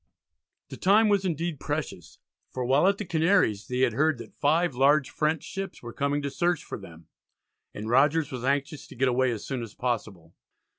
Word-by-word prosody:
The - - -8
time 210 +3 +4
was 200 -2 +2
indeed 170 -3 -2
precious, 145 - -5 0.3
for 125 -1 -4
while 135 +8 +3
at 200 0 +2
the 210 - -5
Canaries 165 - +2
they 125 0 -2
had 125 -4 +3
heard 150 +3 +2
that 115 - -11
five 160 +2 +1
large 140 +2 +3
French 155 0 0
ships 195 -6 -6
were 120 -1 -8
coming 140 +1 -1
to 140 - -3
search 175 +2 0
for - - -7
them, 85 -4 -13 0.7
and 105 +1 -7
Rogers 145 +5 +3
was 125 -2 -5
anxious 140 +2 -1
to - - -13
get 130 +2 +1
away 130 +1 +2
as 115 -4 -4
soon 130 -3 -3
as 115 -3 -8
possible. 105 -9 -4
140 Hz, 195 wpm, -27 LUFS, 120-160 Hz, 0.7 s, time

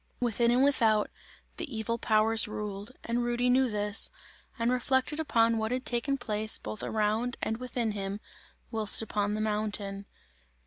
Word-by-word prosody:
Within 235 -1 +1
and 245 +2 +4
without, 225 -7 +3 0.5
the 285 -9 -5
evil 230 +2 -2
powers 220 +1 +2
ruled, 210 +1 -5
and 235 +1 -1
Rudy 240 +1 +1
knew 260 0 +3
this, 210 0 +3 0.5
and 235 0 +1
reflected 260 +4 0
upon 230 -7 +2
what 220 +1 -2
had 255 +1 -2
taken 245 +3 0
place 215 -3 +1
both 215 - -7
around 220 +3 -1
and 220 - -2
within 245 -2 -2
him, 200 0 -4 0.5
whilst 220 -1 +4
upon 210 -1 -1
the 215 - -2
mountain. 210 -2 -2
225 Hz, 150 wpm, -29 LUFS, 210-245 Hz, 0.5 s, and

